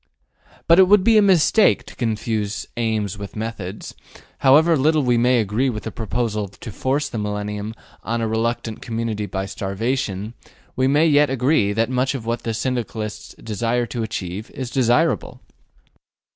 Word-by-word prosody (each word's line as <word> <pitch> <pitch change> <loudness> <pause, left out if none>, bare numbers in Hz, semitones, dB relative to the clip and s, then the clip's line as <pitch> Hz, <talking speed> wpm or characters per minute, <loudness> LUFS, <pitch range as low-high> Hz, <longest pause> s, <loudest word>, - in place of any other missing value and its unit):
But 170 +2 +6
it 190 - +7
would 205 0 +5
be 225 0 +5
a - - +5
mistake 195 +2 +4
to - - -12
confuse 110 -3 -2
aims 110 -4 -1
with 100 -1 -8
methods: 105 -3 -6 0.5
however 155 +5 +5
little 155 +1 +2
we 125 -1 +2
may 120 +1 +3
agree 110 +5 0
with 110 -3 -5
the - - -5
proposal 110 -2 -2
to 105 +4 -10
force 135 +7 -1
the 115 - -5
millennium 105 +1 -4 0.3
on 115 +1 -2
a 115 - -1
reluctant 110 0 -2
community 110 -2 -3
by 95 -1 -3
starvation, 100 +2 -3 0.4
we 130 0 +2
may 145 +4 +4
yet 150 -2 +4
agree 130 -4 +2
that 115 +3 0
much 130 +2 0
of 120 -4 -6
what 115 +1 -2
the 115 -1 -3
Syndicalists 115 -3 -4
desire 115 +3 -1
to 120 0 -5
achieve 105 -2 -5
is 130 -2 -5
desirable. 130 +6 +1
115 Hz, 160 wpm, -21 LUFS, 105-130 Hz, 0.5 s, it